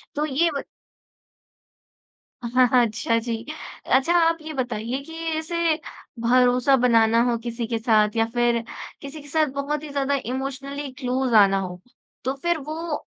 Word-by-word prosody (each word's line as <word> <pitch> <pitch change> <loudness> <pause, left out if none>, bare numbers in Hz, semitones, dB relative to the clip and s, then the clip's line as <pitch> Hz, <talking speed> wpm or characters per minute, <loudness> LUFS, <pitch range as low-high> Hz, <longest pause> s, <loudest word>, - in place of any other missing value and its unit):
तो 300 - 0
ये 310 +4 +2
बत - - -5 1.8
हाँ, 250 +2 +3
हाँ, 245 0 +4
अच्छा 230 +1 0
जी। 230 0 -3 0.5
अच्छा 270 +6 +3
आप 330 -1 +3
ये 310 0 -7
बताइए 245 -1 -3
कि 325 - -11 0.2
ऐसे 335 0 0 0.5
भरोसा 250 +2 +4
बनाना 230 -2 +4
हो 235 - +1
किसी 235 -1 -3
के 230 0 -1
साथ 215 -2 +3
या 225 - +3
फिर 240 -1 +2 0.4
किसी 285 +2 -8
के 290 - -14
साथ 310 +1 +2
बहुत 285 +2 -2
ही 305 - -7
ज़्यादा 280 0 0
इमोशनली 275 +2 -4
क्लोज़ 255 -1 -1
आना 195 -2 +6
हो। 180 -1 -5 0.4
तो 260 +2 -1
फिर 345 -1 +2
वो, 315 +2 -5
260 Hz, 155 wpm, -24 LUFS, 235-290 Hz, 1.8 s, आना